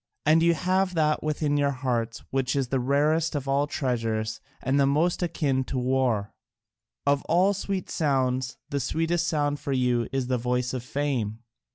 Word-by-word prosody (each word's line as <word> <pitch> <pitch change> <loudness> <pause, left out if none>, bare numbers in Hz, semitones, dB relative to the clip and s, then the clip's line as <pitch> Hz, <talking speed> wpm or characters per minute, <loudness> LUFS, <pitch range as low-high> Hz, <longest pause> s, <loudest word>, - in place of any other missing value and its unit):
And 155 +2 +5
you 170 0 +4
have 185 +2 +1
that 155 -2 +2
within 150 -1 0
your 145 -1 +2
hearts 125 -4 -2
which 135 0 0
is 135 -3 0
the 135 - +1
rarest 150 +5 +1
of 140 -2 -3
all 140 +1 +2
treasures 115 -6 -2 0.2
and 135 +3 +1
the 140 - +4
most 160 +7 +1
akin 140 -6 0
to 135 - -4
war: 125 -5 0 0.7
of 140 0 +3
all 185 +4 +3
sweet 195 -1 -3
sounds 130 -3 0
the 140 - 0
sweetest 165 +5 0
sound 145 -3 0
for 140 0 -3
you 125 -2 +1
is 135 -1 -1
the 125 -1 0
voice 125 +1 -1
of 130 - -2
fame. 125 -5 -2
140 Hz, 175 wpm, -26 LUFS, 125-155 Hz, 0.7 s, And